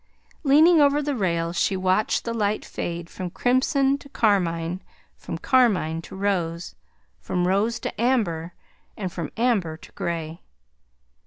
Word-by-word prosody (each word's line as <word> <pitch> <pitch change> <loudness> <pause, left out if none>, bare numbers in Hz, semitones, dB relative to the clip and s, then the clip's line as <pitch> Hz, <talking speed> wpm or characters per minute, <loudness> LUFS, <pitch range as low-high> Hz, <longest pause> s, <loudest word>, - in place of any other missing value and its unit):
Leaning 310 +3 +6
over 285 0 +4
the 295 -1 -1
rail, 170 -5 -1
she 190 +2 +1
watched 185 +3 +1
the 230 - -2
light 210 -2 -1
fade 170 -1 -5
from 180 0 -6
crimson 270 - +1
to 280 - -14
carmine, 180 - 0 0.3
from - - -6
carmine 200 - +2
to - - -11
rose, 180 -4 -2 0.5
from 180 0 -1
rose 210 +5 +1
to - - -5
amber, 185 -10 0 0.5
and 185 -4 -4
from 165 -4 -4
amber 210 -10 +1
to - - -15
gray. 165 -1 -4
195 Hz, 140 wpm, -24 LUFS, 170-245 Hz, 0.5 s, Leaning